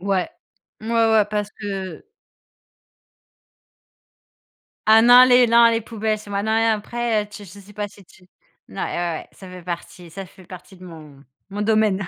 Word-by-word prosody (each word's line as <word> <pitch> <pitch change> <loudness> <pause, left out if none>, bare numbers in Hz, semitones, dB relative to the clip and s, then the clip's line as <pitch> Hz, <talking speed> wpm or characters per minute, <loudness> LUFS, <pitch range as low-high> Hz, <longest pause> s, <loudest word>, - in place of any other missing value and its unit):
Ouais, 190 -1 -1 0.5
ouais, 220 - -8
ouais, 225 -2 +3
parce 210 -1 -3
que 195 -4 -6 2.8
Ah 220 +1 +7
non, 245 +2 +8
les 250 -1 +5
non, 235 0 +5
les 230 - 0
poubelles, 220 -1 -3
c'est 210 - -14
moi, 200 0 -2
non, 220 +1 -1
et 225 - +2
après 225 +1 -1
heu, 205 - -10
tu 210 0 -12
je 185 +3 -14
sais 200 +1 -15
pas 205 0 -5
si 200 -1 -18
tu 180 +1 -22 0.4
n - - -14
ouais, - - -1
ouais, 175 -2 -4
ça 190 - -13
fait 180 -1 -11
partie 175 0 -8
ça 195 +2 -8
fait 185 - -18
partie 185 +1 -13
de 185 - -14
mon 150 -5 -13 0.2
mon 205 +1 -5
domaine. 210 -3 +1
205 Hz, 180 wpm, -21 LUFS, 185-220 Hz, 2.8 s, non